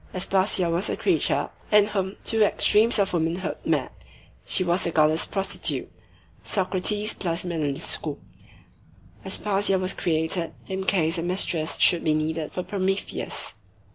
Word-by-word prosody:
Aspasia 190 0 +1
was 170 +3 -1
a - - -2
creature - - 0 0.2
in 210 -1 +6
whom 195 -2 -3
two 225 -1 +1
extremes 215 +2 +4
of 195 -2 +1
womanhood 170 +2 -1
met; - - -2 0.4
she 185 - +2
was 175 +1 +1
the - - +1
goddess 155 0 +2
prostitute; 195 -1 0 0.5
Socrates 205 +2 0
plus 170 -1 -2
Manon 155 -5 -2
Lescaut. 165 - -1 1.1
Aspasia 200 -1 0
was 185 0 -2
created 165 +1 -1
in 190 0 -4
case 170 -3 +2
a - - -1
mistress 170 -2 0
should 175 - +5
be 155 -2 +2
needed 155 0 -2
for 180 - -4
Prometheus." 195 +1 -3
185 Hz, 140 wpm, -24 LUFS, 165-195 Hz, 1.1 s, in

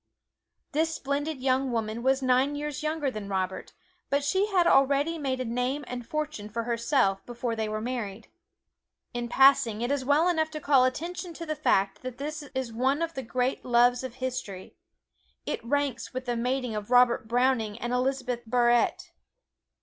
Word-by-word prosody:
This 320 +1 0
splendid 285 +1 -3
young 260 0 +1
woman 225 0 -2
was 265 +2 +2
nine 260 +3 +2
years 295 -1 -4
younger 305 -3 -1
than 210 -4 -6
Robert, 190 -1 -3 0.4
but 280 0 +1
she 380 +8 +1
had 370 -4 +2
already 285 +2 +3
made 265 -3 -2
a 255 - -2
name 250 +5 -2
and 250 -1 -5
fortune 305 -9 -4
for 230 +2 -3
herself 235 -3 +1
before 240 -1 -3
they 220 -1 -2
were 215 0 -2
married. 225 -3 -4 0.9
In 240 0 -3
passing 265 -4 +5
it 240 - -1
is 285 -2 0
well 290 +6 +3
enough 320 -3 +1
to 310 -1 -6
call 275 -3 +4
attention 340 +6 -3
to 335 - -6
the 310 -1 -2
fact 200 -9 +1
that 255 -1 -6
this 300 +2 -4
is 260 -3 -3
one 265 +7 +1
of 330 0 -3
the 265 - -4
great 250 +2 -1
loves 245 0 +3
of 255 -2 -6
history. 255 -8 -5 0.7
It - - -3
ranks 275 0 -2
with 255 0 -3
the 240 -1 -1
mating 250 0 -1
of 210 0 -5
Robert 245 -2 +4
Browning 235 -3 +1
and 240 +1 -3
Elizabeth 250 -1 -1
Barrett. 240 0 +2
255 Hz, 175 wpm, -27 LUFS, 235-285 Hz, 0.9 s, passing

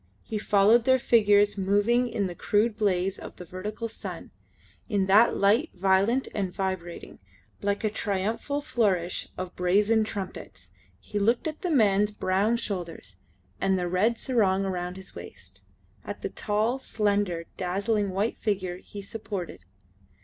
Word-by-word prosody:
He 215 - -4
followed 210 +3 +4
their 260 0 +5
figures 205 -4 +4
moving 205 +6 +2
in 220 -3 -1
the 180 - -4
crude 210 +5 +1
blaze 195 -2 0
of - - -9
the 180 - -10
vertical 210 +6 -5
sun, 225 - -8 0.6
in 200 -4 +1
that 210 +5 +5
light 215 +11 +3
violent 195 +7 +2
and 195 -3 -2
vibrating, 185 -3 -5 0.4
like 200 0 -1
a 215 - +2
triumphal 215 +8 -2
flourish 200 - 0
of 185 0 -5
brazen 205 +5 +3
trumpets. 200 -3 -7 0.3
He 205 - -4
looked 230 +9 +2
at 310 -1 -5
the 360 - -1
man's 210 -8 +3
brown 205 +2 +1
shoulders, 170 - -6 0.4
at 195 0 +2
the 180 -1 -1
red 205 +7 +1
sarong 200 -8 +1
round 180 -1 -3
his 190 0 -12
waist; - - -12 0.4
at - - -7
the - - -1
tall, 220 +5 -1
slender, 205 -8 -1
dazzling 200 +3 0
white 200 +4 -1
figure 185 -4 -2
he 200 +2 -10
supported. 195 - -6
205 Hz, 145 wpm, -27 LUFS, 185-220 Hz, 0.6 s, their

